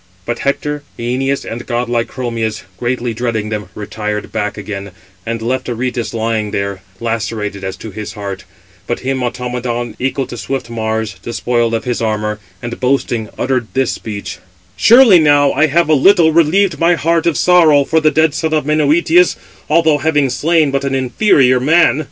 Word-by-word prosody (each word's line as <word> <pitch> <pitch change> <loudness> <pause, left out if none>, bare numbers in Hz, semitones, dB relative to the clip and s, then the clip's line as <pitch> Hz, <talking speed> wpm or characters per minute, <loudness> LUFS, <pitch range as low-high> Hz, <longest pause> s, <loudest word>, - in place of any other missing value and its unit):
But 120 - -3
Hector, 145 +1 -2 0.2
Æneas, 130 +3 -1
and 120 +1 -7
godlike 120 -1 -1
Chromius, 115 -4 -3 0.2
greatly 120 -1 -2
dreading 110 -2 -2
them, 105 -1 -4
retired 105 0 -4
back 105 +1 -3
again, 100 -1 -6 0.4
and 115 -1 -3
left 130 +2 -2
Aretus 120 0 -3
lying 110 -2 -1
there, 100 -1 -3 0.2
lacerated 110 -3 -3
as 95 0 -4
to 110 - -9
his 105 +2 -7
heart; 100 -3 -6 0.4
but - - -3
him 130 +1 -2
Automedon, 120 -1 -3
equal 135 +1 -1
to 120 - -8
swift 135 -1 -4
Mars, 110 -2 -3
despoiled 120 +1 -1
of 115 - -3
his 125 -2 -2
armour, 105 -1 -2 0.2
and, 120 0 -5
boasting, 125 -4 0
uttered 125 -3 -1
this 130 -2 +1
speech: 105 -2 -6 0.4
"Surely 230 -6 +7
now 145 -2 +4
I 155 +4 +2
have 170 +3 +2
a 155 - +3
little 160 +2 +5
relieved 170 +2 +3
my 170 +1 +4
heart 165 +1 +1
of 165 - +1
sorrow 165 -5 +5
for 160 +3 +1
the 155 - +4
dead 155 0 +2
son 160 +1 -1
of 150 - 0
Menœtius, 155 +4 +3 0.3
although 155 -1 +3
having 145 -3 +1
slain 155 +1 +2
but 140 0 -1
an 135 -1 -1
inferior 130 - +3
man." 155 +3 +3
125 Hz, 170 wpm, -15 LUFS, 115-150 Hz, 0.4 s, Surely